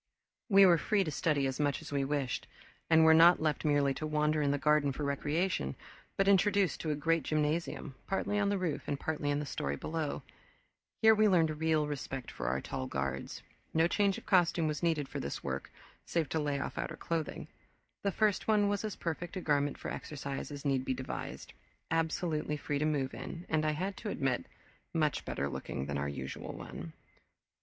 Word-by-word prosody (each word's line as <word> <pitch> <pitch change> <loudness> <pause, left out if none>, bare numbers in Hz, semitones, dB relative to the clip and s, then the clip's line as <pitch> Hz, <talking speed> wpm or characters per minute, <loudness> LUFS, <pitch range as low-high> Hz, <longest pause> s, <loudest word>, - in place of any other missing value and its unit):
We 195 -1 +8
were 175 -3 +6
free 200 +5 +2
to 155 - -3
study 150 -2 +1
as 135 +1 -2
much 145 -1 +1
as - - -10
we 140 -1 +1
wished, 135 -2 -2 0.4
and 160 0 +6
were 160 - +8
not 170 +2 +7
left 155 -2 0
merely 145 -2 +3
to 155 - -4
wander 150 0 +1
in 145 - +2
the 145 - +2
garden 150 0 +3
for 140 +3 -4
recreation 145 - 0 0.4
but 195 - +2
introduced 200 -1 +3
to 160 - -3
a 150 - +1
great 165 +2 +1
gymnasium, 155 0 -1
partly 205 +1 0
on 200 -1 +2
the 200 - +1
roof 180 -5 -2
and 140 - -2
partly 150 -2 -2
in 145 - +1
the 150 - -2
story 70 - -2
below. 155 - -3 0.8
Here 220 0 +9
we 215 0 +4
learned 160 -5 +3
real 160 -2 +3
respect 135 -3 -5
for - - -5
our - - +1
tall 65 - -4
guards. 70 0 -3 0.3
No 160 +1 +5
change 200 +1 +2
of - - -11
costume 175 -3 +3
was 150 -1 -2
needed 160 -5 +1
for - - -5
this 70 - -4
work, 65 0 -4 0.4
save 165 -3 0
to 160 - 0
lay 145 -2 -1
off - - -4
outer - - -4
clothing. 165 -2 -3 0.5
The 200 - 0
first 210 0 +1
one 210 -2 +4
was 205 0 -1
as 215 -3 -3
perfect 170 +2 -4
a - - -1
garment 145 -3 +1
for - - -5
exercise 140 -2 -5
as 145 0 -7
need 135 -2 +2
be 130 - -1
devised, 130 0 -6 0.4
absolutely 160 -2 0
free 145 -1 -2
to 150 - +1
move 145 -4 0
in, 175 +1 -7
and, 155 -1 +2
I 155 0 +1
had 190 +6 -2
to 210 - -5
admit, 130 - -1 0.5
much 155 -2 +1
better 70 - -2
looking 70 -1 -4
than 70 0 -2
our 70 +1 -1
usual 65 -1 -6
one. 80 +1 -8
150 Hz, 200 wpm, -32 LUFS, 140-170 Hz, 0.8 s, Here